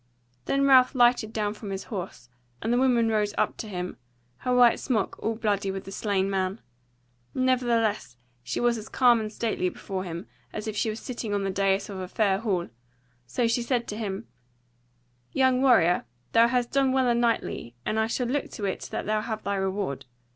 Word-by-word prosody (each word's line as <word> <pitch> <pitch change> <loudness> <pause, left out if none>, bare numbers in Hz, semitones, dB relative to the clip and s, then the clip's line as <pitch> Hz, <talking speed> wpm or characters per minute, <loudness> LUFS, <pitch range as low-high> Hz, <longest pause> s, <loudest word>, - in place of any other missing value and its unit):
Then 275 0 +2
Ralph 260 -1 +6
lighted 240 -3 +4
down 210 -2 -1
from 210 -1 -8
his 195 0 -4
horse, 185 - -6 0.3
and 225 - -1
the - - +3
woman 245 -3 +3
rose 210 -2 0
up - - +1
to 220 - -6
him, 180 -3 -5 0.4
her 250 - -2
white 245 -2 +6
smock 220 -7 -1
all 225 +1 -1
bloody 205 -3 0
with 190 0 -4
the 195 - -9
slain 195 -2 0
man. 190 +1 -1 0.8
Nevertheless 235 - +1 0.4
was 240 -1 +2
she - - -4
as 215 - -10
calm 245 -3 +5
and 215 -1 -4
stately 215 -5 -1
before 190 0 -5
him, 170 0 -6 0.3
as 215 - -5
if 215 - -3
she 215 +1 0
were 215 - -3
sitting 225 -3 -4
on 200 - 0
the 195 - -1
dais 195 0 +1
of 195 -2 -6
a 185 - -4
fair 195 -1 +1
hall; 195 -6 -1 0.6
so 235 - 0
she 230 +1 +1
said 235 0 -1
to 210 - -3
him: 210 0 -4 1.1
"Young 260 -1 +3
warrior, 180 - +4 0.3
thou 230 0 +6
hast 245 0 0
done 270 -1 +2
well 260 -1 +3
and 240 0 +2
knightly, 230 - -1
and 220 - 0
I 220 - +2
shall 245 +2 -1
look 275 +4 -1
to 205 - -4
it 190 - -3
that - - -4
thou 215 0 +1
have 220 -1 -4
thy 200 - -1
reward. 190 -8 -2
215 Hz, 200 wpm, -27 LUFS, 195-240 Hz, 1.1 s, Ralph